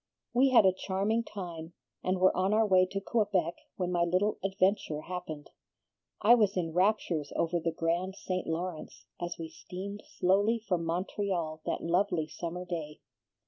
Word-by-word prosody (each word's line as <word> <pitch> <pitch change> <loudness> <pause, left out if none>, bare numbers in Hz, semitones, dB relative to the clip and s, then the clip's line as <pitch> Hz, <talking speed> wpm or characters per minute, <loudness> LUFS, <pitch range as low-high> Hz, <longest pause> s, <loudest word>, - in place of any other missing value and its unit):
We 260 +3 +5
had 240 -5 +6
a 190 - +5
charming 200 +5 0
time, 170 -6 -7 0.3
and 185 +1 +1
were 185 +1 +4
on 190 +3 +2
our 220 0 +4
way 185 -2 +5
to 195 +1 -3
Quebec 195 -5 +1 0.2
when 180 -1 -2
my 175 -1 +2
little 185 +5 +1
adventure 190 -5 +1
happened. 165 -4 -6 0.7
I 230 - +8
was 210 -5 +3
in 165 -3 -1
raptures 180 -5 +1
over 170 +1 +1
the 165 0 -1
grand 170 +4 -1
St. 185 -2 -3
Lawrence 160 -8 -4
as 175 0 -4
we 165 - -5
steamed 200 +5 -7
slowly 200 +5 +2
from 180 -7 -2
Montreal 175 -2 -2
that - - -1
lovely 170 -1 +1
summer 175 +2 -5
day. 160 -4 -5
185 Hz, 160 wpm, -30 LUFS, 170-200 Hz, 0.7 s, I